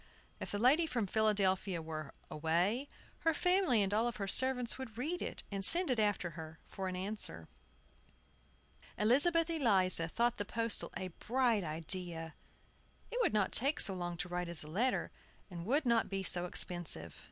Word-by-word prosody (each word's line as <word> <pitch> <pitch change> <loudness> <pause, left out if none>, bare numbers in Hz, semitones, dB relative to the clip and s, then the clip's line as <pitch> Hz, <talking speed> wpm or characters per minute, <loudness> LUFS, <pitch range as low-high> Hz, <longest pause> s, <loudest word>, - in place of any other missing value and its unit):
If - - -6
the 205 - -3
lady 280 +9 +4
from 240 -7 -2
Philadelphia 195 -3 0
were 155 -3 -7 0.2
away, 175 - 0 0.3
her 325 -1 +1
family 360 - +2
and 195 +1 -2
all 230 +3 +1
her 205 -3 -5
servants 250 +3 0
would 230 -5 -8
read 315 +8 -3
it, - - -4
and 195 -1 -4
send 345 - +6
it 245 - 0
after 205 -5 0
her, 160 0 -10
for 190 -1 -6
answer. 185 - -5 1.5
Elizabeth 315 +10 +3
Eliza 195 - +2
thought 235 +7 0
the 205 - -2
postal 230 +2 -1
a 185 - -5
bright 235 +2 0
idea. 165 0 -2 0.8
It 485 - -3
would - - +2
not 210 -3 +1
take 280 +5 +3
so 195 - +2
long 175 -2 -5
to 175 - -4
write 180 -1 -4
as 170 -2 -1
a - - -11
letter, 230 +11 -1 0.4
and 170 +1 -7
would 285 +4 +1
not 235 -2 +2
be 195 -1 -3
so 180 0 0
expensive. 170 - +3
205 Hz, 165 wpm, -34 LUFS, 175-250 Hz, 1.5 s, send